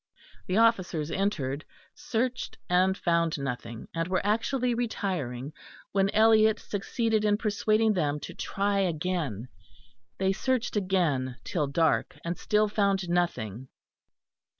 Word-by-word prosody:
The 185 Hz, -, 0 dB
officers 185 Hz, -9 st, +2 dB
entered, 155 Hz, -8 st, -1 dB, 0.3 s
searched, 250 Hz, +2 st, -2 dB
and 185 Hz, +2 st, +3 dB
found 170 Hz, -2 st, +1 dB
nothing; 125 Hz, -4 st, -5 dB
and 165 Hz, 0 st, -1 dB
were 185 Hz, +1 st, -1 dB
actually 240 Hz, +4 st, +1 dB
retiring, 165 Hz, -, -3 dB, 0.4 s
when 195 Hz, 0 st, +2 dB
Eliot 220 Hz, 0 st, +5 dB
succeeded 220 Hz, +2 st, -1 dB
in 205 Hz, -1 st, +3 dB
persuading 215 Hz, 0 st, +2 dB
them 150 Hz, -5 st, 0 dB
to -, -, -7 dB
try 200 Hz, 0 st, -1 dB
again; 165 Hz, -, -1 dB, 0.7 s
they 190 Hz, 0 st, +1 dB
searched 255 Hz, +3 st, -1 dB
again 165 Hz, -11 st, 0 dB
till 150 Hz, -5 st, -1 dB
dark, 160 Hz, +3 st, +1 dB
and 170 Hz, +1 st, -1 dB
still 210 Hz, +3 st, +2 dB
found 200 Hz, -3 st, +1 dB
nothing. 130 Hz, -, -1 dB
190 Hz, 120 wpm, -28 LUFS, 155-215 Hz, 0.7 s, Eliot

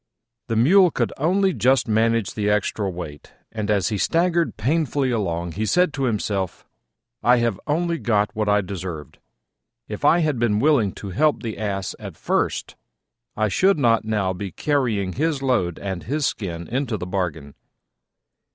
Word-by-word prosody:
The 115 Hz, -, -1 dB
Mule 180 Hz, -, +6 dB
could -, -, -1 dB
only 190 Hz, +6 st, +2 dB
just 130 Hz, -3 st, +2 dB
manage 115 Hz, -1 st, +1 dB
the 105 Hz, -1 st, -1 dB
extra 105 Hz, -1 st, 0 dB
weight, 80 Hz, -5 st, -8 dB, 0.2 s
and, 110 Hz, -2 st, -4 dB
as 105 Hz, -1 st, +2 dB
he 105 Hz, -3 st, -2 dB
staggered 170 Hz, -, +1 dB
painfully 140 Hz, +1 st, 0 dB
along, 85 Hz, -6 st, -2 dB
he 105 Hz, +6 st, -2 dB
said 180 Hz, -, +2 dB
to 135 Hz, -, -1 dB
himself, 100 Hz, -5 st, -2 dB, 0.6 s
"I 125 Hz, +1 st, +5 dB
have 115 Hz, -4 st, 0 dB
only 170 Hz, +2 st, 0 dB
got 105 Hz, -2 st, 0 dB
what 105 Hz, -1 st, 0 dB
I 105 Hz, 0 st, +4 dB
deserved: 90 Hz, -6 st, -7 dB, 0.7 s
if 105 Hz, +4 st, -7 dB
I 165 Hz, +4 st, +5 dB
had 150 Hz, -6 st, 0 dB
been 115 Hz, -3 st, +2 dB
willing 120 Hz, -5 st, +3 dB
to 100 Hz, -, -8 dB
help 150 Hz, -, +1 dB
the 110 Hz, -2 st, -4 dB
Ass 100 Hz, -3 st, -2 dB
at -, -, -9 dB
first, -, -, -1 dB, 0.6 s
I 110 Hz, 0 st, +2 dB
should 190 Hz, -, +3 dB
not 115 Hz, -5 st, +3 dB
now 105 Hz, -4 st, 0 dB
be 95 Hz, +1 st, -6 dB
carrying 115 Hz, -, 0 dB
his 150 Hz, -1 st, -1 dB
load 115 Hz, -11 st, +1 dB
and 95 Hz, -3 st, -4 dB
his 145 Hz, +4 st, -1 dB
skin 85 Hz, -8 st, -3 dB
into 125 Hz, -2 st, -2 dB
the 90 Hz, -, -5 dB
bargain." 85 Hz, -6 st, -3 dB
110 Hz, 165 wpm, -22 LUFS, 95-140 Hz, 0.7 s, Mule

